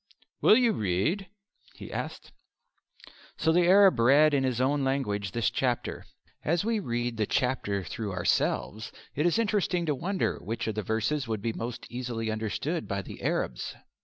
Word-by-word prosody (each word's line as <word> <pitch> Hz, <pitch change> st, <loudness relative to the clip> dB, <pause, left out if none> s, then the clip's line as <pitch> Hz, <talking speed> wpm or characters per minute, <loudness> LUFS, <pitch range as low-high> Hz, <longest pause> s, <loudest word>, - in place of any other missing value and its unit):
"Will 215 Hz, -, +7 dB
you 245 Hz, -3 st, +4 dB
read?" 105 Hz, -, 0 dB, 0.5 s
he -, -, -9 dB
asked. -, -, -5 dB, 1.1 s
So 160 Hz, -, +2 dB
the 175 Hz, +1 st, +4 dB
Arab 195 Hz, -5 st, +6 dB
read 145 Hz, +6 st, +6 dB
in 135 Hz, -2 st, +2 dB
his 130 Hz, -3 st, 0 dB
own 140 Hz, +2 st, +2 dB
language 105 Hz, -8 st, -1 dB
this 115 Hz, 0 st, 0 dB
chapter. 125 Hz, -2 st, -2 dB, 0.4 s
As 170 Hz, +5 st, +1 dB
we 225 Hz, -1 st, +1 dB
read 120 Hz, -, -2 dB
the 110 Hz, -2 st, 0 dB
chapter 110 Hz, -6 st, 0 dB
through 105 Hz, +2 st, -5 dB
ourselves 100 Hz, +4 st, 0 dB, 0.2 s
it 150 Hz, +5 st, +1 dB
is 175 Hz, -, +2 dB
interesting 205 Hz, -6 st, +1 dB
to 150 Hz, -, +1 dB
wonder 185 Hz, +8 st, -1 dB
which 115 Hz, +3 st, -4 dB
of 110 Hz, -, -1 dB
the 110 Hz, -, -2 dB
verses 115 Hz, +7 st, -1 dB
would 110 Hz, -3 st, -3 dB
be 115 Hz, -, -1 dB
most 115 Hz, +2 st, -5 dB
easily 120 Hz, -3 st, -3 dB
understood 110 Hz, -, -2 dB
by 100 Hz, -1 st, -2 dB
the -, -, -10 dB
Arabs. -, -, -2 dB
125 Hz, 165 wpm, -28 LUFS, 110-160 Hz, 1.1 s, Will